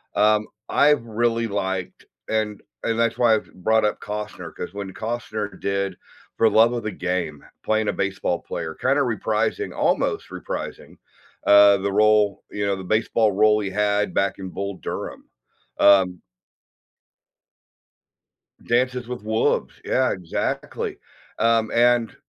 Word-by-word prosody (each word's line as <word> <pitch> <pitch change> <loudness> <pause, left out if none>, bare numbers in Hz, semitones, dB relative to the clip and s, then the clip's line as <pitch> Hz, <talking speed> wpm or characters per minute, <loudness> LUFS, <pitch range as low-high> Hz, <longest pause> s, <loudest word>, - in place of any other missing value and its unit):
um, 105 0 +3 0.2
I've 145 -4 +4
really 115 +1 0
liked 95 -3 -3 0.2
and 110 -2 -1 0.2
and 115 -1 0
that's 115 0 +1
why 115 -3 +5
I've 105 - -5
brought 110 +4 +1
up 105 - -1
Costner, 105 0 -6
'cause - - -7
when 100 -2 -6
Costner 110 -2 -4
did 100 -1 -2 0.4
For 115 - +5
Love 115 +2 +5
of 120 -2 -3
the 105 - -3
Game, 90 -6 -3 0.2
playing 110 0 +1
a - - +1
baseball 95 -3 -1
player, 80 -1 -5
kinda 135 +3 +1
reprising- 110 -4 -1
almost - - 0
reprising- - - -6 0.5
uh, 100 0 +8
the 100 +1 -2
role 105 -1 +3
you 105 0 -2
know, 100 -1 +1
the 95 - -8
baseball 110 +2 +1
role 105 +2 +4
he 100 - -3
had 105 +1 +1
back 100 - 0
in 95 -1 -6
Bull 100 +1 -4
Durham, - - -6 0.5
um 95 -3 +5 2.5
Dances 125 0 +1
with 125 -3 -6
Wolves, 110 +1 0
yeah, 130 0 +1
exactly. 90 -3 -3 0.4
Um, 115 -1 +3
and 120 -1 +3
105 Hz, 135 wpm, -23 LUFS, 100-115 Hz, 2.5 s, uh